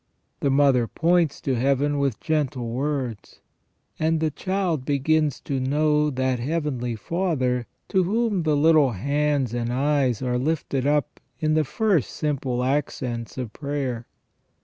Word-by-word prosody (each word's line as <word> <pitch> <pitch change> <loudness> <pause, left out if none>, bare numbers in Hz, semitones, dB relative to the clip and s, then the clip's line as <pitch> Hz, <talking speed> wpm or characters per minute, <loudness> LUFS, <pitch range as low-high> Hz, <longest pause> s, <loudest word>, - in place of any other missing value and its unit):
The 140 - +1
mother 135 -3 +4
points 170 +2 +1
to 135 - 0
Heaven 140 +3 +1
with 140 -5 0
gentle 135 -7 -1
words, 130 -3 -3 0.6
and 160 +1 +2
the 160 -1 0
child 185 -3 -1
begins 145 +1 +1
to 135 -2 -2
know 150 +3 +2
that 130 -2 -1
Heavenly 130 -4 -2
Father 130 - -1 0.2
to 190 -1 +3
whom 210 0 +1
the 155 -2 +1
little 150 -4 +4
hands 140 +2 0
and 120 0 -2
eyes 135 -2 +1
are 125 -1 0
lifted 140 -2 -1
up 145 -2 0 0.2
in 155 0 +1
the 155 0 +3
first 190 - +1
simple 135 -4 -2
accents 125 -4 -2
of 120 -4 -4
prayer. 140 -5 -3
140 Hz, 140 wpm, -24 LUFS, 125-155 Hz, 0.6 s, mother